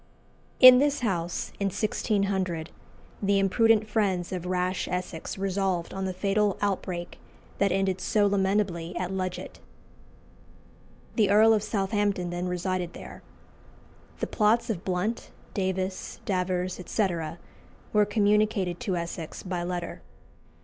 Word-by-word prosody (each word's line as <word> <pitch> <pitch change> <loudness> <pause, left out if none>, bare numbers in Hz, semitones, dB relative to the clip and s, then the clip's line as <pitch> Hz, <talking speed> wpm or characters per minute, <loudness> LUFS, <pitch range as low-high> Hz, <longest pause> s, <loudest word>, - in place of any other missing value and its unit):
In 255 -1 +10
this 290 0 +1
house, 175 -7 -2
in 200 - +1
1600, 195 -4 -1 0.5
the 200 0 +2
imprudent 215 +2 +3
friends 195 -5 0
of 180 -1 -4
rash 185 0 -1
Essex 180 -2 -4
resolved 190 -3 -1
on 195 0 -3
the 190 - -1
fatal 200 +1 +1
outbreak 185 -3 -3 0.4
that 200 -1 +3
ended 190 0 0
so 210 -1 +2
lamentably 190 -3 0
at 180 +1 -2
Ludgate. 185 -1 -4 1.6
The 210 -4 +4
Earl 215 +2 +6
of 215 - +2
Southampton 200 -3 -1
then 175 +1 -3
resided 180 0 -2
there. - - -10 1.0
The - - 0
plots 230 +2 +2
of 180 -5 -5
Blount, 190 +5 -2 0.2
Davis, 190 -1 -2
Davers, 180 -1 -1
etc., 175 -4 -2 0.6
were 210 -1 +5
communicated 205 -3 +1
to 185 -3 -1
Essex 170 -1 -5
by 180 -2 -3
letter. 175 0 -4
190 Hz, 120 wpm, -27 LUFS, 180-205 Hz, 1.6 s, In